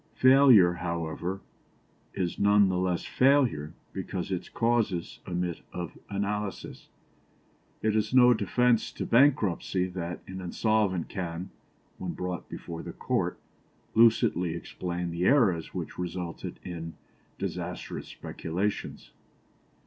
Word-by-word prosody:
Failure, 130 Hz, -9 st, +7 dB
however, 85 Hz, +2 st, -3 dB, 0.7 s
is 90 Hz, -3 st, -2 dB
none 100 Hz, -1 st, +5 dB
the 90 Hz, -, 0 dB
less 90 Hz, -1 st, 0 dB
failure 125 Hz, -, +2 dB, 0.2 s
because 95 Hz, 0 st, -4 dB
its 90 Hz, -1 st, -3 dB
causes 115 Hz, -7 st, 0 dB
admit 90 Hz, -1 st, -2 dB
of 85 Hz, -4 st, -5 dB
analysis. 100 Hz, 0 st, -4 dB, 0.9 s
It 110 Hz, -1 st, +2 dB
is 110 Hz, 0 st, +1 dB
no 125 Hz, -1 st, +7 dB
defence 120 Hz, +2 st, +2 dB
to -, -, -4 dB
bankruptcy 110 Hz, -, +3 dB
that 90 Hz, -1 st, -5 dB
an 95 Hz, 0 st, -7 dB
insolvent 95 Hz, -1 st, +1 dB
can, 90 Hz, -1 st, -5 dB, 0.5 s
when -, -, -4 dB
brought 90 Hz, -2 st, -5 dB
before 85 Hz, -1 st, -7 dB
the -, -, -7 dB
Court, -, -, -1 dB, 0.6 s
lucidly 110 Hz, -7 st, +4 dB
explain 85 Hz, 0 st, -4 dB
the 85 Hz, +2 st, -1 dB
errors 105 Hz, -, +3 dB
which -, -, -5 dB
resulted 90 Hz, -1 st, -5 dB
in 85 Hz, -2 st, -6 dB, 0.4 s
disastrous -, -, -5 dB
speculations. 95 Hz, +5 st, -4 dB
95 Hz, 110 wpm, -28 LUFS, 85-110 Hz, 0.9 s, Failure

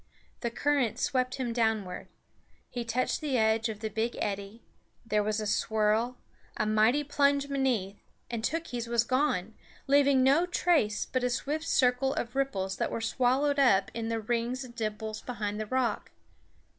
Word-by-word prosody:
The 235 Hz, -, -2 dB
current 270 Hz, -1 st, 0 dB
swept 255 Hz, -1 st, 0 dB
him 250 Hz, -3 st, -2 dB
downward; 220 Hz, -6 st, -1 dB, 0.6 s
he 245 Hz, -1 st, -3 dB
touched 235 Hz, +6 st, -1 dB
the 285 Hz, -4 st, 0 dB
edge 220 Hz, 0 st, +2 dB
of 215 Hz, -1 st, -6 dB
the 220 Hz, -, -2 dB
big 225 Hz, +3 st, -2 dB
eddy; 200 Hz, +2 st, -4 dB, 0.4 s
there 215 Hz, -1 st, +1 dB
was 215 Hz, +1 st, -1 dB
a 215 Hz, -, -3 dB
swirl, 220 Hz, +3 st, +1 dB, 0.4 s
a 215 Hz, -, +1 dB
mighty 215 Hz, +7 st, +3 dB
plunge 280 Hz, -1 st, +2 dB
beneath, 250 Hz, -8 st, -1 dB, 0.3 s
and 235 Hz, -2 st, -4 dB
Tookhees 275 Hz, -6 st, -2 dB
was 235 Hz, -1 st, +2 dB
gone, 235 Hz, -6 st, 0 dB, 0.3 s
leaving 280 Hz, -1 st, +4 dB
no 290 Hz, +7 st, +4 dB
trace 325 Hz, -12 st, +1 dB
but 255 Hz, -1 st, -2 dB
a 250 Hz, -, +2 dB
swift 295 Hz, +6 st, -2 dB
circle 255 Hz, +1 st, +2 dB
of 240 Hz, +2 st, -4 dB
ripples 195 Hz, -9 st, -1 dB
that -, -, -1 dB
were -, -, -3 dB
swallowed 260 Hz, +5 st, +1 dB
up 200 Hz, -8 st, +4 dB
in 230 Hz, -1 st, -3 dB
the 230 Hz, 0 st, -1 dB
rings 240 Hz, +4 st, -2 dB
and 250 Hz, -2 st, -11 dB
dimples 215 Hz, -1 st, -4 dB
behind 210 Hz, -4 st, -4 dB
the 215 Hz, -, -3 dB
rock. 250 Hz, -3 st, -1 dB
235 Hz, 165 wpm, -29 LUFS, 215-265 Hz, 0.6 s, leaving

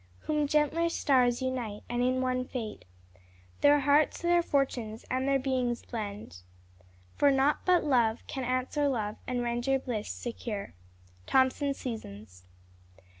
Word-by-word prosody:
Whom 300 Hz, -1 st, 0 dB
gentler 305 Hz, +3 st, +2 dB
stars 255 Hz, -5 st, +2 dB
unite, 245 Hz, -5 st, -3 dB
and 240 Hz, 0 st, -1 dB
in 255 Hz, +1 st, +1 dB
one 255 Hz, 0 st, 0 dB
fate 240 Hz, -4 st, -6 dB, 0.7 s
Their 290 Hz, 0 st, +5 dB
hearts, 290 Hz, +2 st, +3 dB
their 345 Hz, 0 st, +4 dB
fortunes, 245 Hz, -8 st, -1 dB
and 260 Hz, +1 st, 0 dB
their 275 Hz, 0 st, +3 dB
beings 255 Hz, -3 st, -1 dB
blend...... 205 Hz, -, -6 dB, 0.8 s
for 285 Hz, -, +4 dB
naught 275 Hz, +2 st, +3 dB
but 360 Hz, -1 st, +4 dB
love 240 Hz, -6 st, +2 dB
Can 265 Hz, -, -5 dB
answer 255 Hz, +4 st, 0 dB
love, 215 Hz, -6 st, -2 dB
and 245 Hz, -1 st, -1 dB
render 240 Hz, +3 st, 0 dB
bliss 240 Hz, -5 st, -4 dB
secure." 225 Hz, -4 st, -5 dB, 0.5 s
_Thomson's 270 Hz, +1 st, +2 dB
Seasons. 100 Hz, -, -8 dB
255 Hz, 130 wpm, -29 LUFS, 235-280 Hz, 0.8 s, Their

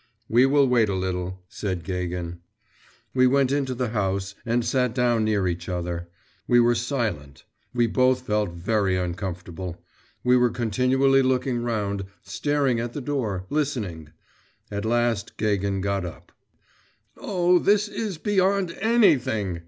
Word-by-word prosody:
'We 120 Hz, +4 st, +5 dB
will 140 Hz, 0 st, +4 dB
wait 120 Hz, -4 st, +3 dB
a 100 Hz, -, 0 dB
little,' 95 Hz, 0 st, -3 dB
said 95 Hz, -3 st, -4 dB
Gagin. 90 Hz, -2 st, -4 dB, 0.7 s
We 130 Hz, -1 st, +4 dB
went 135 Hz, 0 st, +3 dB
into 135 Hz, -2 st, 0 dB
the 125 Hz, -1 st, -1 dB
house 100 Hz, -2 st, -1 dB
and 120 Hz, 0 st, +1 dB
sat 125 Hz, -3 st, +1 dB
down 120 Hz, -3 st, +2 dB
near 105 Hz, -3 st, +1 dB
each 85 Hz, +1 st, -3 dB
other. 85 Hz, -1 st, -3 dB, 0.4 s
We 120 Hz, -, +5 dB
were 120 Hz, 0 st, +4 dB
silent. 115 Hz, -, -3 dB, 0.3 s
We 120 Hz, -1 st, +2 dB
both 130 Hz, +2 st, +2 dB
felt 105 Hz, -4 st, 0 dB
very 95 Hz, +2 st, 0 dB
uncomfortable. 90 Hz, -1 st, -5 dB, 0.4 s
We 125 Hz, 0 st, +5 dB
were 125 Hz, 0 st, +4 dB
continually 130 Hz, +4 st, +2 dB
looking 130 Hz, -1 st, 0 dB
round, 100 Hz, -4 st, -2 dB, 0.2 s
staring 135 Hz, +4 st, 0 dB
at 120 Hz, 0 st, -4 dB
the 145 Hz, -, -4 dB
door, 115 Hz, -10 st, -2 dB
listening. 110 Hz, -, -2 dB, 0.6 s
At 100 Hz, +1 st, -3 dB
last 115 Hz, -2 st, 0 dB
Gagin 100 Hz, -2 st, 0 dB
got 100 Hz, -1 st, -1 dB
up. 85 Hz, -2 st, -9 dB, 0.8 s
'Oh, 180 Hz, -2 st, +2 dB
this 205 Hz, +2 st, +3 dB
is 210 Hz, -4 st, -4 dB
beyond 195 Hz, 0 st, +1 dB
anything! 130 Hz, -, +2 dB
115 Hz, 140 wpm, -25 LUFS, 95-130 Hz, 0.8 s, We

